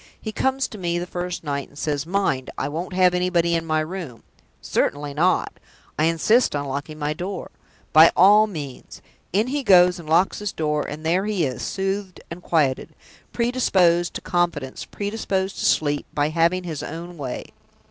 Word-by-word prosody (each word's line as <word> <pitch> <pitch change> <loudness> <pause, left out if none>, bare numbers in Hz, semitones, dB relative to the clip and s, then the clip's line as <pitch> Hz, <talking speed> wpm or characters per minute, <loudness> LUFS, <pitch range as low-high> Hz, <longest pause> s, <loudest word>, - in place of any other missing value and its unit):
He 215 - -5
comes 265 +4 0
to 215 - -9
me 175 -1 -1
the 175 - -3
first 180 -1 -5
night, 140 -2 -3
and 145 - -18
says: 150 0 -2
'Mind, 175 -9 0
I - - -1
won't 165 +6 -5
have 180 -1 +4
anybody 180 -1 +1
in 165 -1 -1
my 155 0 +1
room!' 155 -7 -6 0.4
'Certainly 145 0 -1
not!' 170 +5 +1 0.4
'I 155 - +4
insist 165 +7 +3
on 145 0 -2
locking 140 +3 -5
my 150 0 -1
door.' 180 +4 -6 0.4
'By 160 +2 +8
all 210 +4 +7
means!' 145 -10 -8 0.3
In 205 +5 +2
he 280 +3 -2
goes, 180 -5 +5
and 160 -2 -10
locks 170 +4 +3
his 210 -2 -4
door; 150 -1 0
and 155 +2 -7
there 180 +4 +1
he 205 -6 0
is, 130 -2 -4
soothed 195 -1 -3
and 170 +1 -7
quieted, 150 -7 0 0.4
predisposed 190 -8 +2
to - - -4
confidence, 170 -7 -2
predisposed 200 -2 -3
to - - -1
sleep, 145 -1 +1
by 145 0 +1
having 170 +3 +1
his 160 -5 -5
own 170 +3 -7
way. 135 -5 -6
170 Hz, 180 wpm, -23 LUFS, 150-190 Hz, 0.4 s, By